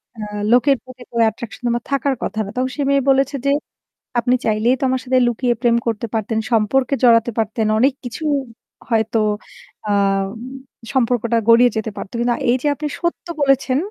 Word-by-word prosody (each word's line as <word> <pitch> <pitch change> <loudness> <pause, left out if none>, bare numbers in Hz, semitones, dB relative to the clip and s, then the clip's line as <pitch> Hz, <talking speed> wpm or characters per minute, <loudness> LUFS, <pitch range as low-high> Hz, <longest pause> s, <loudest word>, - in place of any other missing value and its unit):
অ্যা 215 -1 -6 0.3
লোকের 270 +3 +5
প্রতি 255 -1 -14
তো - - -14
attraction 225 +3 -9
তোমার 235 0 0
থাকার 275 0 +1
কথা 220 - -3
না।" - - -8
তখন 255 +1 0
সে - - -1
মেয়ে 280 0 +3
বলেছে 270 +1 +2
যে 280 - +3 0.7
"আপনি 250 +2 +2
চাইলেই 220 +4 +2
তো - - -4
আমার 260 0 0
সাথে 255 0 +2
লুকিয়ে 240 +1 +1
প্রেম 235 -2 +3
করতে 225 0 -1
পারতেন, 220 0 -1
সম্পর্কে 235 +5 +2
জড়াতে 235 -1 +5
পারতেন। 220 0 0
অনেক 265 +2 +4
কিছু 245 +6 -6 0.7
হয়তো 225 -1 +1 0.7
আম 195 -1 +2 0.7
সম্পর্কটা 235 -2 +1
গড়িয়ে 240 +2 +7
যেতে 220 0 -2
পারতো। 190 - -7
কিন্তু 240 0 +1 0.2
এই 245 - +4
যে 295 - 0
আপনি 300 +1 -4
সত্য 345 0 -3
বলেছেন, 275 -1 +2
240 Hz, 175 wpm, -19 LUFS, 220-260 Hz, 0.7 s, গড়িয়ে